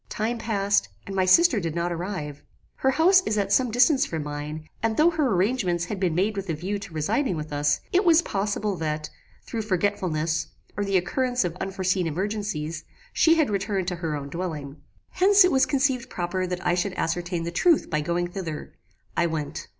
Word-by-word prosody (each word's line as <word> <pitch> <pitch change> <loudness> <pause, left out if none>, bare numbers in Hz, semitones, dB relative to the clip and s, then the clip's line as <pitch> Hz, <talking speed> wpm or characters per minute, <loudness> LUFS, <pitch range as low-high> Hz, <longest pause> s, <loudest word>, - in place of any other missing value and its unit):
"Time 230 +2 -2
passed, 200 - +1 0.2
and 195 - -6
my 190 -1 +2
sister 270 - +5
did 165 -3 -3
not 170 +1 -1
arrive; 165 -5 -5 0.4
her 265 - +2
house 350 +7 +5
is 215 - 0
at 200 -1 0
some 255 -2 +3
distance 250 +5 +4
from 160 -2 -3
mine, 150 +1 -6
and 225 -1 0
though 325 +3 +5
her 310 -4 +1
arrangements 185 -3 +1
had 200 +1 -5
been 180 -4 0
made 200 +4 +1
with 195 -2 -5
a 165 - 0
view 190 +6 -3
to 200 - -9
residing 175 - 0
with 150 -1 -6
us, 145 0 +1
it 370 +3 +4
was 340 -2 +5
possible 205 - -1
that, 155 -2 -3 0.3
through 230 - -4
forgetfulness, 180 -6 -1 0.3
or 205 - -1
the 195 -1 +2
occurrence 250 +7 0
of 175 -1 -3
unforeseen 185 -2 -1
emergencies, 170 -3 -3 0.3
she 325 0 +5
had 310 -8 +2
returned 195 -2 -1
to 180 -2 -2
her 165 -3 -2
own 140 -1 -5
dwelling. 155 -4 -5 0.3
"Hence 390 +1 +5
it 365 - +2
was 265 -1 +3
conceived 260 -3 0
proper 185 -1 -2
that 180 0 -4
I - - +3
should 180 +2 -1
ascertain 175 0 -2
the 170 - -3
truth 335 - +3
by 155 -1 +1
going 170 +3 -1
thither. 175 -4 -6 0.4
I 170 - +2
went. 155 -3 -4
190 Hz, 195 wpm, -25 LUFS, 165-225 Hz, 0.4 s, sister